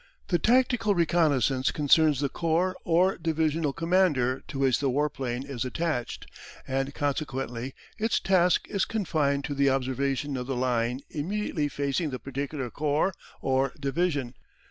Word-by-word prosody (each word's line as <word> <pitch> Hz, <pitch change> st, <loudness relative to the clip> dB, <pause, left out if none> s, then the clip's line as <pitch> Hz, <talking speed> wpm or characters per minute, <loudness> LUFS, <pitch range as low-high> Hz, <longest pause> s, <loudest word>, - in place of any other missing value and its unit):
The 175 Hz, -, +2 dB
tactical 240 Hz, -1 st, +3 dB
reconnaissance 145 Hz, -7 st, +2 dB
concerns 150 Hz, -1 st, +3 dB
the 140 Hz, -, 0 dB
corps 170 Hz, +4 st, 0 dB
or 180 Hz, +3 st, +3 dB
divisional 160 Hz, -2 st, 0 dB
commander 165 Hz, -6 st, +1 dB
to -, -, -6 dB
which 135 Hz, -3 st, +2 dB
the 140 Hz, -, +1 dB
warplane 135 Hz, -2 st, -2 dB
is 130 Hz, -4 st, -3 dB
attached, 130 Hz, -1 st, -3 dB, 0.4 s
and 135 Hz, +1 st, -1 dB
consequently 135 Hz, -4 st, -3 dB, 0.2 s
its 225 Hz, +1 st, +1 dB
task 180 Hz, -2 st, +3 dB
is 200 Hz, -2 st, 0 dB
confined 150 Hz, -10 st, 0 dB
to 145 Hz, -, -3 dB
the 140 Hz, 0 st, +3 dB
observation 135 Hz, +1 st, -1 dB
of 125 Hz, 0 st, -4 dB
the 135 Hz, -, -2 dB
line 125 Hz, 0 st, 0 dB
immediately 165 Hz, -1 st, -2 dB
facing 145 Hz, +3 st, -1 dB
the 130 Hz, -, -4 dB
particular 135 Hz, -1 st, -4 dB
corps 150 Hz, +5 st, 0 dB, 0.3 s
or 135 Hz, +2 st, +1 dB
division. 140 Hz, -3 st, -1 dB
145 Hz, 140 wpm, -27 LUFS, 135-165 Hz, 0.4 s, tactical